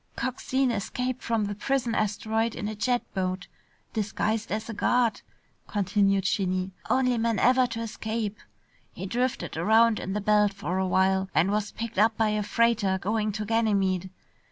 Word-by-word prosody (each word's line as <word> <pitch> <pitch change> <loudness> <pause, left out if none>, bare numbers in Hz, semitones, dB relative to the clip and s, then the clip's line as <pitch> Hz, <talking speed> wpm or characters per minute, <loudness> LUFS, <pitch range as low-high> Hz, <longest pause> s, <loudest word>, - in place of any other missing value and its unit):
"Coxine 260 0 0
escaped 250 +3 -3
from 225 -2 0
the 205 - -3
prison 240 +3 -1
asteroid 220 +1 0
in 205 - -4
a 215 - -3
jet 240 +3 0
boat, 185 -1 -2 0.5
disguised 215 +1 -1
as 215 +2 -2
a 230 - -5
guard," 235 +1 +1 0.5
continued 195 -1 +1
Shinny. 185 -2 0 0.2
"Only 250 -1 +2
man 230 -1 +1
ever 255 +4 +4
to 230 -1 -5
escape. 220 -1 -3 0.5
He - - -6
drifted 245 +5 -2
around 225 +1 +4
in 190 - -4
the 210 - -1
belt 210 0 +3
for 190 -2 -2
a 190 - +1
while 190 +1 +2
and 185 +4 +3
was 210 0 -1
picked 230 -3 -4
up 220 +1 +4
by 220 -1 +2
a 210 0 0
freighter 210 -2 +2
going 210 +3 -1
to 215 +1 -3
Ganymede. 200 -5 +1
215 Hz, 165 wpm, -27 LUFS, 195-230 Hz, 0.5 s, ever